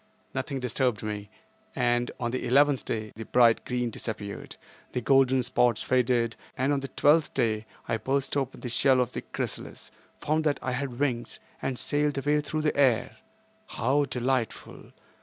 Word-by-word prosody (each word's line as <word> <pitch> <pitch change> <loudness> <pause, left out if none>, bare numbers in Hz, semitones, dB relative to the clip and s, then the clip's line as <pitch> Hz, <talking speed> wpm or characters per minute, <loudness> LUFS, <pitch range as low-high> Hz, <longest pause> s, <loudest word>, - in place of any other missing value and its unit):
Nothing 130 +1 -3
disturbed 125 -2 0
me, 105 -1 -4 0.5
and 120 -1 +1
on 120 -2 -1
the 130 - -3
eleventh 140 +2 +4
day 110 -1 -3
the 115 +1 -7
bright 120 -2 +4
green 125 -1 -1
disappeared, 105 -2 -5 0.4
the - - 0
golden 130 0 +4
spots 120 -2 +2
faded, 120 -2 +2 0.2
and 135 +2 +2
on 140 - +1
the 135 - -5
twelfth 150 +3 +3
day 110 -1 0 0.2
I 115 - 0
burst 135 +4 -1
open 135 -2 -2
the 125 - -4
shell 130 +2 +3
of 125 -3 +1
the - - -4
chrysalis, - - -5 0.3
found 155 +1 0
that 145 -2 +2
I 130 - -3
had 125 -1 -3
wings 125 -5 -1 0.2
and 130 - -2
sailed 145 +1 0
away 145 +2 +2
through 155 +1 -3
the 150 - 0
air. 125 -2 +2 0.5
How 135 +5 +1
delightful! 125 -3 -2
125 Hz, 165 wpm, -27 LUFS, 120-140 Hz, 0.5 s, eleventh